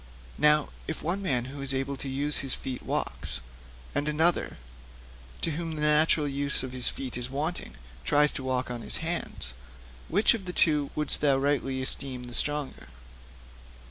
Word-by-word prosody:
'Now, 150 0 +5 0.2
if 160 - -5
one 175 +5 -1
man 130 -10 0
who 140 +2 -8
is 135 0 +2
able 135 +1 -2
to 135 - -6
use 145 +2 +1
his 135 -2 +1
feet 130 -1 -6
walks, - - -3 0.5
and 145 - -1
another 160 +3 +1 0.8
to 165 - +1
whom 165 +1 -4
the 150 - -5
natural 150 0 +3
use 140 -1 0
of 130 - -5
his 125 -1 +1
feet 130 -2 -5
is 125 +1 -5
wanting 150 +6 -3 0.3
tries 150 - +3
to 135 - -5
walk 130 -1 -2
on 120 -1 -5
his - - +2
hands, 165 - -3 0.5
which 205 +8 +3
of 215 -5 -5
the 180 - -5
two 150 -5 +3
wouldst 150 0 +7
thou 140 -2 +3
rightly 135 -1 0
esteem 130 -1 -1
the 120 0 -8
stronger?' 145 - -1
145 Hz, 175 wpm, -27 LUFS, 130-150 Hz, 0.8 s, wouldst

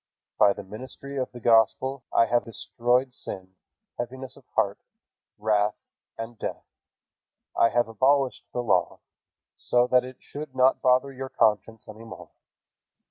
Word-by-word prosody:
By 100 - +6
the - - -8
ministry 130 +7 -8
of 130 - -2
the 125 - -10
Gospel 120 +3 +3
I 115 - +5
have 120 0 +1
destroyed 125 +3 0
sin, 95 -6 -6 0.5
heaviness 130 +2 -5
of - - -19
heart, 100 -2 +1 0.6
wrath, 105 -1 +1 0.4
and 115 0 -7
death. - - -5 0.9
I 115 - +5
have 120 0 +1
abolished 130 +4 +1
the 125 - -2
Law, 110 - +1 0.5
so 120 0 +2
that 125 -1 +5
it 130 0 -9
should 145 -2 -9
not 130 +1 +4
bother 130 +2 +3
your 130 0 -6
conscience 110 -1 +1
any 110 +1 -10
more. 115 - -11
120 Hz, 140 wpm, -26 LUFS, 110-130 Hz, 0.9 s, By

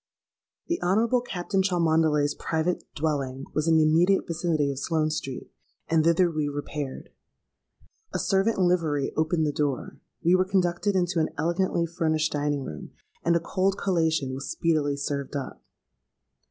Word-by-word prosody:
"The 340 - -2
Honourable 225 +7 +2
Captain 190 -3 -1
Cholmondeley's 160 -5 +2
private 165 +2 -1
dwelling 140 -3 -2
was 155 +1 0
in 165 -1 +5
the 160 - +5
immediate 170 +5 +3
vicinity 160 -4 0
of 135 - -5
Sloane 155 +1 0
Street; 135 -4 -5 0.4
and 160 -1 +3
thither 170 +2 +3
we 155 -2 -1
repaired. 145 -1 -5 1.0
A - - -2
servant 195 +3 +1
in 185 -2 +3
livery 155 -6 0
opened 160 +1 +1
the 150 - +1
door: 140 -2 -2 0.3
we 175 - +5
were 185 0 +5
conducted 185 +1 0
into 175 -2 +1
an 155 - +1
elegantly 170 +2 0
furnished 160 -2 0
dining 145 -1 -1
room, 75 - -8 0.3
and 170 0 +3
a - - +4
cold 190 +3 0
collation 160 -7 0
was 135 +1 -5
speedily 150 -4 0
served 140 0 -3
up. 140 -2 -5
160 Hz, 155 wpm, -26 LUFS, 145-175 Hz, 1.0 s, in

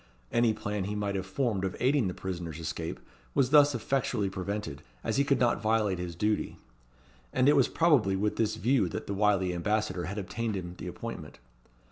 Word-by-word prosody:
Any 120 -1 +3
plan 105 -2 -3
he 105 +1 -3
might 105 -1 -1
have 95 -1 -3
formed 105 -1 -1
of 95 -1 -2
aiding 130 -3 +3
the 90 - -4
prisoner's 85 -4 -5
escape 80 0 -4 0.4
was 135 -2 +3
thus 145 -2 +6
effectually 115 -4 0
prevented, 95 -6 -4 0.2
as - - -1
he 140 - +4
could 140 -1 +2
not 120 -4 +2
violate 110 -4 +1
his 90 -2 -5
duty; 105 +4 -1 0.7
and 130 +1 +2
it 145 - +6
was 135 -3 +5
probably 140 - +3
with 105 +2 0
this 110 -1 +1
view 115 -4 +2
that - - -5
the 100 - -3
wily 100 -3 +2
ambassador 95 0 -1
had 100 +3 -5
obtained 110 +2 -3
him 90 -2 -5
the - - -6
appointment. - - -7
105 Hz, 190 wpm, -29 LUFS, 95-120 Hz, 0.7 s, thus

